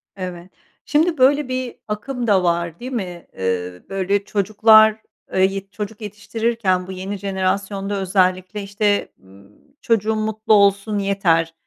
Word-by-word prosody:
Evet. 180 Hz, -1 st, -7 dB, 0.3 s
Şimdi 315 Hz, +3 st, +2 dB
böyle 280 Hz, +2 st, +4 dB
bir 255 Hz, -1 st, -3 dB
akım 235 Hz, +3 st, -4 dB
da 190 Hz, -3 st, +3 dB
var, 170 Hz, -1 st, -1 dB
değil 255 Hz, +2 st, -7 dB
mi? 180 Hz, -7 st, -5 dB
Eee, 90 Hz, -1 st, -3 dB
böyle, 195 Hz, +1 st, 0 dB
çocuklar, 215 Hz, +2 st, +4 dB, 0.3 s
eee, 190 Hz, -, +2 dB
yet 195 Hz, 0 st, -6 dB
çocuk 210 Hz, +1 st, -6 dB
yetiştirirken 210 Hz, -2 st, -1 dB
bu -, -, -7 dB
yeni 190 Hz, +2 st, -5 dB
jenerasyonda 195 Hz, +1 st, -2 dB
özellikle, 185 Hz, +1 st, 0 dB
işte, 205 Hz, +1 st, 0 dB
ııı, 100 Hz, +1 st, -19 dB, 0.3 s
"Çocuğum 220 Hz, -1 st, +1 dB
mutlu 215 Hz, 0 st, 0 dB
olsun 200 Hz, +1 st, +3 dB
yeter, 175 Hz, -5 st, +1 dB
200 Hz, 135 wpm, -20 LUFS, 185-220 Hz, 0.3 s, böyle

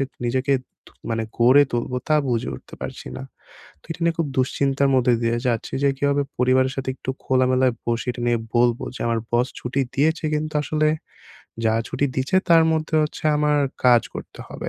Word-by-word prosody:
যে 135 Hz, -, +2 dB, 0.2 s
নিজেকে 130 Hz, +3 st, 0 dB, 0.6 s
মানে 115 Hz, 0 st, -1 dB, 0.2 s
গড়ে 130 Hz, +5 st, +6 dB
তুলবো 120 Hz, +1 st, -2 dB
তা 155 Hz, -, +4 dB
বুঝে 115 Hz, -, -1 dB
উঠতে -, -, -12 dB
পারছি -, -, -7 dB
না। -, -, -6 dB, 0.6 s
তো -, -, -23 dB
এটা 165 Hz, -, -7 dB
নিয়ে 170 Hz, -1 st, +2 dB
খুব 165 Hz, -, +1 dB
দুশ্চিন্তার 135 Hz, +1 st, +1 dB
মধ্যে 125 Hz, -1 st, +3 dB
দিয়ে 115 Hz, 0 st, +1 dB
যাচ্ছি 115 Hz, -2 st, -2 dB
যে 140 Hz, -, +4 dB
কীভাবে 140 Hz, 0 st, +1 dB
পরিবারের 130 Hz, +1 st, +2 dB
সাথে 135 Hz, -1 st, -3 dB
একটু 130 Hz, -, -8 dB
খোলামেলায় 130 Hz, -1 st, +2 dB
বসে 120 Hz, +1 st, -1 dB
এটা 120 Hz, -, -8 dB
নিয়ে 120 Hz, -1 st, +2 dB, 0.2 s
বলবো 120 Hz, 0 st, +2 dB
যে, -, -, -8 dB
আমার 115 Hz, -1 st, +1 dB
বস 120 Hz, +2 st, +2 dB
ছুটি 125 Hz, +3 st, -3 dB, 0.2 s
দিয়েছে 160 Hz, +4 st, +1 dB
কিন্তু 155 Hz, 0 st, -3 dB
আসলে, 155 Hz, 0 st, +1 dB, 0.8 s
যা 110 Hz, -, +3 dB, 0.2 s
ছুটি 145 Hz, -, -1 dB
দিছে 135 Hz, +8 st, +1 dB
তার 165 Hz, -1 st, +7 dB
মধ্যে 155 Hz, 0 st, -2 dB
হচ্ছে 150 Hz, +1 st, -5 dB
আমার 150 Hz, 0 st, +2 dB, 0.3 s
কাজ 120 Hz, -2 st, +6 dB
করতে -, -, -9 dB
হবে। -, -, -6 dB
130 Hz, 185 wpm, -22 LUFS, 120-145 Hz, 0.8 s, তার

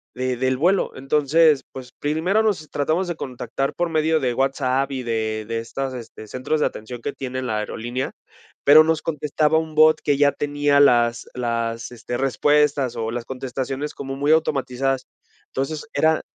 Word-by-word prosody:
de 130 Hz, -1 st, -1 dB
del 130 Hz, +1 st, +1 dB
vuelo? 180 Hz, +7 st, +2 dB
Entonces, 150 Hz, +2 st, +3 dB
pues, 130 Hz, -1 st, -9 dB
primero 160 Hz, +8 st, +1 dB
los 185 Hz, -8 st, -1 dB
tratamos 160 Hz, +6 st, 0 dB
de 170 Hz, -, -2 dB
contactar 135 Hz, +1 st, -3 dB
por 175 Hz, 0 st, -1 dB
medio 160 Hz, 0 st, +2 dB
de 125 Hz, -2 st, 0 dB
WhatsApp 135 Hz, +1 st, 0 dB
y 130 Hz, -2 st, -3 dB
de 110 Hz, -2 st, -2 dB
de 115 Hz, 0 st, -2 dB
estas, 130 Hz, +3 st, -4 dB
este, 115 Hz, -3 st, -9 dB
centros 130 Hz, +7 st, -2 dB
de -, -, +4 dB
atención 115 Hz, +2 st, -8 dB
que 145 Hz, -, -3 dB
tiene 130 Hz, -1 st, -5 dB
la 110 Hz, -4 st, -1 dB
aerolínea, 120 Hz, +4 st, -4 dB, 0.5 s
pero, 150 Hz, +2 st, +9 dB
nos 160 Hz, 0 st, 0 dB
contestaba 150 Hz, 0 st, +1 dB
un 160 Hz, -1 st, -6 dB
bot 155 Hz, 0 st, +6 dB
que 145 Hz, -2 st, +2 dB
ya 145 Hz, 0 st, +4 dB
tenía 145 Hz, 0 st, +1 dB
las 120 Hz, -3 st, +3 dB
las, 115 Hz, -2 st, -2 dB
este, 120 Hz, 0 st, -5 dB
respuestas 140 Hz, 0 st, +2 dB
o 110 Hz, 0 st, -2 dB
las 120 Hz, 0 st, -4 dB
contestaciones 135 Hz, +2 st, -4 dB
como 135 Hz, -1 st, -6 dB
muy 145 Hz, +2 st, +1 dB
automatizadas. 135 Hz, -4 st, 0 dB, 0.5 s
Entonces, 150 Hz, +7 st, -3 dB
era 160 Hz, 0 st, +2 dB
135 Hz, 170 wpm, -22 LUFS, 125-150 Hz, 0.5 s, pero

